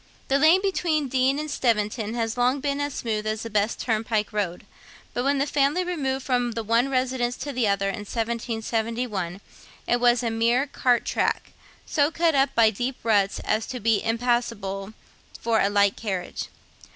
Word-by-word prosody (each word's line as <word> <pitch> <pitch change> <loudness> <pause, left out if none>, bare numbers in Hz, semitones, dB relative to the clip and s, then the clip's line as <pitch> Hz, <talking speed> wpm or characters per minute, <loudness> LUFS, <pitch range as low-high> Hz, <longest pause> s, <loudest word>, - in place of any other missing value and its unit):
The 275 +1 +3
lane 325 +6 +6
between 320 -7 0
Deane 265 +2 +2
and 305 0 -4
Steventon 220 -1 0
has 225 -1 -1
long 250 +3 +2
been 280 +1 -1
as 285 -1 -3
smooth 215 -2 -2
as 215 0 -2
the 230 - -6
best 210 +1 0
turnpike 220 -2 -1
road; 190 -4 -2 0.5
but 245 - -1
when 280 +1 +2
the 275 - +1
family 290 +4 +1
removed 270 -7 -2
from 245 -2 0
the 230 0 -3
one 230 +4 +2
residence 255 -2 0
to 285 - -5
the 245 -3 +1
other 200 0 +1
in 195 - -3
1771, 225 -4 -2 0.4
it 240 - +1
was 245 0 +3
a 230 - 0
mere 235 +4 +2
cart 250 -3 +1
track, - - -1 0.3
so 290 -2 +2
cut 330 0 +1
up 270 -1 +2
by 225 -2 +5
deep 245 +5 -3
ruts 205 -3 +2
as 220 +1 -1
to 250 - -5
be 220 -2 +2
impassable 225 -4 -1 0.5
for 225 -1 +1
a 200 - +3
light 200 -1 +3
carriage. 190 -5 -4
235 Hz, 175 wpm, -25 LUFS, 215-265 Hz, 0.5 s, lane